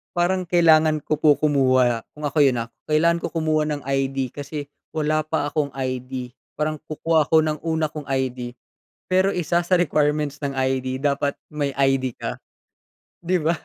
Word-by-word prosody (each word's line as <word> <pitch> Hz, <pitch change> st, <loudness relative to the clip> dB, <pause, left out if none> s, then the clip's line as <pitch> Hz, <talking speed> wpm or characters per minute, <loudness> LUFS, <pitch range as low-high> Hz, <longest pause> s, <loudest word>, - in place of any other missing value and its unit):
parang 180 Hz, +1 st, +1 dB
kailangan 160 Hz, -3 st, +4 dB
ko 155 Hz, -1 st, -1 dB
po 150 Hz, -2 st, +5 dB
kumuha 130 Hz, -5 st, +2 dB
kung 150 Hz, -, -10 dB
ako 145 Hz, +1 st, 0 dB
yun, 130 Hz, -5 st, +4 dB
ah, 115 Hz, -, -14 dB, 0.2 s
kailangan 170 Hz, +2 st, +3 dB
ko -, -, -3 dB
kumuha 155 Hz, -2 st, 0 dB
ng 145 Hz, -1 st, -3 dB
ID 135 Hz, -1 st, -1 dB
kasi 145 Hz, 0 st, -7 dB, 0.2 s
wala 155 Hz, 0 st, +1 dB
pa 150 Hz, -2 st, -2 dB
akong 150 Hz, -2 st, 0 dB
ID. 130 Hz, -1 st, -4 dB, 0.2 s
Parang 155 Hz, 0 st, -2 dB
kukuha 155 Hz, 0 st, 0 dB
ako 160 Hz, -1 st, +4 dB
ng 155 Hz, -1 st, -1 dB
una 160 Hz, -2 st, -1 dB
kong 150 Hz, -2 st, -8 dB
ID 125 Hz, -2 st, -2 dB, 0.6 s
pero 190 Hz, +2 st, +3 dB
isa 175 Hz, 0 st, +1 dB
sa 185 Hz, -, +3 dB
requirements 150 Hz, -3 st, +1 dB
ng 140 Hz, -2 st, -3 dB
ID, 130 Hz, 0 st, -1 dB
dapat 140 Hz, 0 st, +1 dB, 0.2 s
may 145 Hz, -2 st, -2 dB
ID 135 Hz, -2 st, +1 dB
ka. -, -, -5 dB, 0.8 s
Di 180 Hz, +2 st, 0 dB
ba? 165 Hz, +2 st, +2 dB
150 Hz, 165 wpm, -23 LUFS, 135-155 Hz, 0.8 s, po